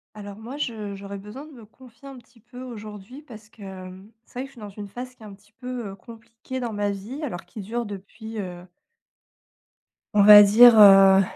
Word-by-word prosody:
Alors 205 -1 -10
moi 235 +6 -9
je 215 -7 -5
j'aurais 200 0 -9
besoin 210 +9 -11
de 310 - -15
me 235 -5 -15
confier 250 +2 -18
un 270 -2 -11
petit 235 0 -21
peu 250 +3 -14
aujourd'hui 215 +2 -11
parce 225 -7 -15
que, 220 - -21 0.3
mmh, 190 +3 -15
c'est 245 - -11
vrai - - -3
que - - -9
je - - -21
suis - - -16
dans 210 -1 -9
une 205 +1 -10
phase 250 +5 -9
qui - - -29
est - - -11
un 205 - -11
petit 205 +2 -28
peu, 250 -3 -6
heu, 195 - -10
compliquée 230 +4 -11
dans 240 -3 -5
ma 205 0 -2
vie, 205 +9 -7
alors 225 -12 -6
qui 215 - -10
dure 235 +4 -5
depuis, 215 +2 -10
heu 180 -2 -8 1.5
on 205 - +4
va 205 0 +10
dire, 230 +4 +7
heu, 195 -1 +7
215 Hz, 220 wpm, -23 LUFS, 200-245 Hz, 1.5 s, va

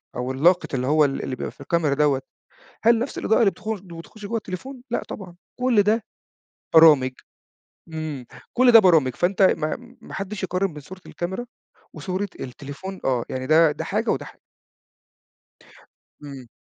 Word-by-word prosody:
أو 125 +1 -3
اللاقط 170 +7 +2
اللي 130 -1 -1
هو 150 +1 +4
ال 135 -1 -2
اللي 130 - -3
بيبقى - - -5
في - - -18
الكاميرا 155 0 +1
دوّة، 140 -2 +2 0.6
هل 230 0 +5
نفْس 245 +4 -4
الإضاءة 220 - +2
اللي 215 -4 +5
بتخ 215 - -11
بتخش 175 +3 -12
جوّه 230 +3 -2
التليفون؟ 245 +6 -7
لأ 240 - -1
طبعًا، 180 -4 -8 0.2
كلّ 250 -5 +4
ده 215 +2 +1 0.7
برامج، 150 -5 +7 0.8
إمم، 155 -5 -5 0.3
كلّ 250 0 +5
ده 230 - +11
برامج، 160 - +4
فأنت 190 +6 +1
ما 235 +8 0
ما - - -11
حدّش 195 +1 -5
يقارن 185 +1 -1
من 150 - -10
صورة 185 +7 -12
الكاميرا 190 +8 -5 0.5
وصورة 190 +1 -3
التليفون 145 +9 -8
آه 125 -3 +1
يعني 130 0 -4
ده 155 +1 +5
ده 150 - -5
حاجة - - -1
وده - - -1
حاجة. - - -14 1.8
إمم. 135 -3 -9
170 Hz, 165 wpm, -23 LUFS, 140-205 Hz, 1.8 s, ده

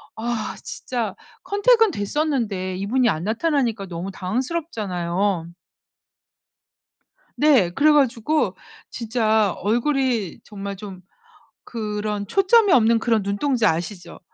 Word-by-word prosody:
아 225 -1 -3
진짜 245 -5 -4 0.3
컨택은 445 +1 +3
됐었는데 205 - -2
이분이 240 +6 +1
안 155 -3 -2
나타나니까 230 - 0
너무 175 +1 -6
당황스럽잖아요. 200 - -2 1.9
네. 265 - +4
그래 300 +10 +4
가지고 285 +1 +1 0.3
진짜 220 -4 +1
얼굴이 240 - 0
정말 200 -1 -7
좀 190 -2 -9 0.6
그런 210 -2 -4
초점이 400 - +4
없는 230 -1 +4
그런 225 -3 +1
눈동자 220 +3 +1
아시죠? 175 +1 -6
220 Hz, 240 characters per minute, -22 LUFS, 195-265 Hz, 1.9 s, 네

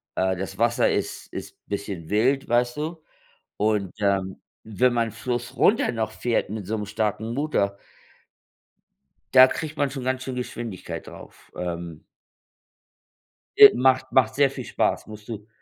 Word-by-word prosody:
Äh, 95 0 +1
das 95 0 -5
Wasser 115 +2 +2
ist - - -3
ist - - -7
bisschen 100 -5 -5
wild, 130 +7 +2
weißt 120 +2 +1
du, 160 +2 -4 0.6
und, 105 -3 0
ähm, 95 -2 0 0.2
wenn 120 +3 +1
man 115 -1 +1
Fluss 120 +3 -4
runter 220 - +3
noch 110 -2 -2
fährt 120 -4 -1
mit 105 -3 -5
so 110 +3 -2
'nem 105 -1 -4
starken 110 +2 -2
Motor 110 -9 0 1.6
da 130 0 +9
kriegt 155 +2 -5
man 145 - +1
schon 135 -1 -6
ganz 130 0 -1
schöne 130 -1 -4
Geschwindigkeit 115 -5 -6
drauf, - - -13
ähm 85 -2 -5 1.6
Äh, - - +11
macht 130 +1 +2
macht 125 -4 +3
sehr 140 -1 +4
viel 130 -1 -7
Spaß, - - -1
musst 105 -1 -11
du 110 -2 -7
115 Hz, 150 wpm, -24 LUFS, 100-130 Hz, 1.6 s, Äh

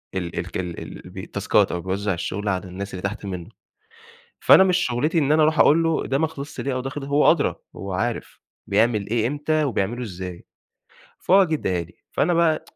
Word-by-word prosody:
ال 90 -2 -3
الك - - -4
ال 90 -2 -4
ال - - -9
الب - - -8
تاسكات - - +1
أو 90 - -3
بيوزّع 95 +2 -1
الشغل 100 +4 -3
على 95 0 -1
الناس 100 +2 -7
اللي 90 - -5
تحت 100 +1 -4
منه. 90 -2 -6 0.9
فأنا 190 - +7
مش 185 -1 +3
شُغلتي 150 +5 0
إن 145 -1 +2
أنا 155 0 +5
أروح 155 +1 +2
أقول 165 +3 +6
له 165 -1 0
ده 135 +1 0
ما 160 - +2
خلصش 145 -2 -8
ليه 135 - -2
أو 130 - -1
ده 135 - -4
خل 135 +1 -6
هو 145 +1 +4
أدرى، 155 -3 +2 0.2
هو 95 +1 -6
عارف 115 +5 -3 0.3
بيعمل 105 0 +2
إيه 115 -1 +1
إمتى 150 +3 0
وبيعمله 120 -1 -1
إزاي. 90 -4 -7 0.8
فهو 195 +2 +5
جه 160 - -2
اداها 90 - -1
لي، 85 +1 -17 0.2
فأنا 175 - +1
بقى 165 -2 +2
120 Hz, 205 wpm, -23 LUFS, 95-155 Hz, 0.9 s, فأنا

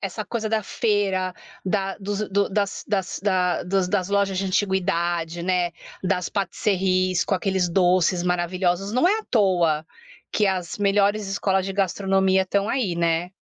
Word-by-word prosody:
Essa 205 +2 -4
coisa 225 -1 -3
da 220 -1 0
feira, 195 -4 0 0.3
da 195 0 -1
dos 205 +1 -3
do 200 +1 +1
das 200 0 -2
das 190 -5 -2 0.5
dos 190 0 +1
das 185 +1 0
lojas 200 -2 +1
de 195 - -1
antiguidade, 175 -3 0
né, 180 -1 +1 0.3
das 180 -2 0
patisserries 185 -2 0
com 195 - 0
aqueles 190 -1 0
doces 180 0 +2
maravilhosos, 180 +2 0
não 255 +8 +3
é 425 - +2
à 440 - -8
toa 175 -8 +2 0.5
que 210 - +2
as 185 -1 -2
melhores 205 +1 +2
escolas 195 -1 0
de 195 - -3
gastronomia 190 0 +2
estão 200 +2 -1
aí, 225 -10 0
né. 170 +1 0
190 Hz, 150 wpm, -23 LUFS, 180-200 Hz, 0.5 s, não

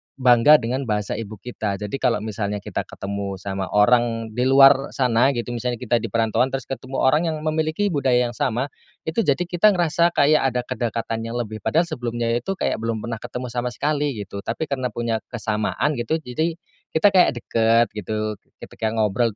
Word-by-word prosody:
bangga 125 +3 +6
dengan 125 0 -1
bahasa 105 -1 -1
ibu 110 -1 -6
kita 105 -1 -4
jadi 105 0 -6
kalau 105 - +1
misalnya 105 -2 -3
kita - - -4
ketemu 100 0 -5
sama 95 -1 -4
orang 115 +1 +3
di 125 +3 0
luar 135 +1 +6
sana 125 +1 +3
gitu 120 +1 -3
misalnya 120 +1 -2
kita 120 -1 +1
di - - -4
perantauan 115 +3 +1
terus 135 -1 -2
ketemu 135 0 -4
orang 150 +6 +3
yang 155 -1 -1
memiliki 155 +5 0
budaya 130 -4 +2
yang - - -6
sama, 120 +4 -2 0.3
itu 160 +6 -2
jadi 145 +5 +2
kita 180 +4 +3
ngerasa 170 0 +2
kayak 150 +2 +5 0.2
ada 125 - +1
kedekatan 115 -2 -3
yang 115 - -5
lebih 110 -3 -4
padahal 160 - +2
sebelumnya 120 -5 -2
itu 190 +12 -1
kayak 110 - -1
belum 115 -1 -3
pernah 115 -1 -4
ketemu 125 +2 -6
sama 120 +1 -2
sekali 145 -2 0
gitu, 100 - -8
tapi 120 +7 -2
karena 130 -2 -1
punya 115 -1 -1
kesamaan 110 +5 -1
gitu 120 +7 0
jadi 160 +7 -2 0.4
kita 160 +6 +5
kayak 185 -2 +5
deket 115 0 +2
gitu 105 0 -4 0.2
ketika 110 - -4
ngobrol 110 0 +1
120 Hz, 185 wpm, -22 LUFS, 110-140 Hz, 0.4 s, bangga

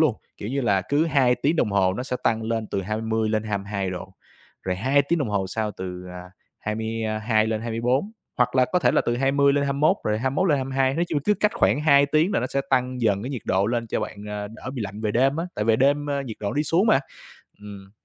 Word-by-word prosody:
luôn, 155 -7 +4 0.2
kiểu 105 - -6
như 140 +2 -1
là, 100 -6 +2
cứ 145 +3 +2
2 135 -5 +3
tiếng 145 +7 0
đồng 105 - +1
hồ 95 -2 +2
nó 125 - -3
sẽ 125 -1 -3
tăng 115 0 +1
lên 110 0 -2
từ 100 -1 -3
20 110 +2 -1
lên 110 0 0
22 100 -2 -3
độ, 95 +1 -7 0.5
rồi 90 -1 -2
2 135 +8 +2
tiếng 170 +5 0
đồng 140 -7 -1
hồ 100 -2 -1
sau 110 +2 -2
từ, 90 -2 -7
à, 90 0 -10 0.3
22 110 0 -1
lên 110 -1 -1
24 120 - -1 0.3
hoặc 125 - +2
là 130 - +5
có 180 - +4
thể - - +3
là - - +3
từ 120 - -1
20 140 +2 +3
lên 140 0 +1
21 140 +7 +2
rồi 105 0 0
21 135 +10 0
lên 145 - +4
22. 135 0 0
Nói 170 - +1
chung 155 - 0
cứ 210 - +3
cách 210 +1 +3
khoảng 145 - +2
2 140 -2 +5
tiếng 155 +7 +2
là - - +1
nó 125 - -1
sẽ 140 - -1
tăng 125 -1 +1
dần 105 -3 +1
cái 130 - -4
nhiệt 125 -6 -5
độ 95 +1 +1
lên 115 +1 -1
cho - - -2
bạn, 105 0 -6
a, 105 0 -4
đỡ 115 +4 -8
bị 120 - -3
lạnh 100 +1 -6
về 110 -1 -1
đêm 135 +6 +2
á, 165 - -1
tại 105 - -2
về 110 0 +3
đêm, 145 +3 +2
a, 140 -1 -1
nhiệt 115 -5 -7
độ 100 -1 -2
đi 150 - +1
xuống 170 +8 +2
mà. 135 - +4 0.6
Ừm. 100 -2 -11
120 Hz, 255 wpm, -24 LUFS, 105-140 Hz, 0.6 s, là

